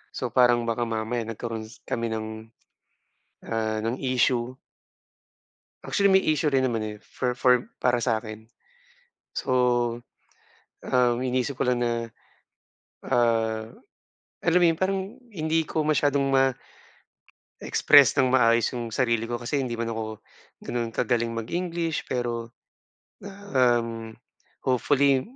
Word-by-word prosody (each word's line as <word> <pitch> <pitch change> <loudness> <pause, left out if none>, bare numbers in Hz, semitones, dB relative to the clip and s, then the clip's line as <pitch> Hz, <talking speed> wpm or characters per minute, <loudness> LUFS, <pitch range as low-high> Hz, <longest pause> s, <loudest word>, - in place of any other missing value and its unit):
So 125 -2 -3
parang 120 -1 +4
baka 115 +1 -1
mamaya 115 +1 -2
nagkaroon 115 -1 -5 0.2
kami 115 0 -2
ng, 110 -1 -3 1.2
ah, 110 -1 -1
ng 115 +3 -2
issue. 125 -1 +1 1.3
Actually, 200 -1 +2
may 190 - +5
issue 155 0 +1
rin 135 -2 +2
naman, 115 -4 0
eh, - - -13
for 125 -1 -3
for 125 -1 +3
para 120 -1 +2
sa'kin. 110 -2 -3 0.9
So, - - -5 1.4
um, 125 -1 +3
iniisip 130 +1 -1
ko - - +1
lang 125 -1 +1
na, 120 - +1 1.1
ah, 115 -3 +1 0.7
alam 170 +1 +3
mo - - +6
'yon, 165 - -2
parang 195 +1 +1 0.3
hindi 160 -2 0
ko 155 - -1
masyadong 145 -2 +1 1.1
ma-express 145 -2 +4
nang 130 -1 +3
maayos 115 -2 +3
yung 120 -2 -4
sarili 115 -2 0
ko. 120 0 -2
Kasi 135 +4 -1
hindi 120 -2 -4
man 115 0 -2
ako 110 -1 -5 0.5
gano'n 120 -1 -2
kagaling 120 -1 0
mag-English 165 +7 -3
pero 120 -2 -3 0.7
na, 200 - -8 0.2
um, 120 -3 +3 0.7
hopefully 135 +1 +3
120 Hz, 120 wpm, -25 LUFS, 115-135 Hz, 1.4 s, mo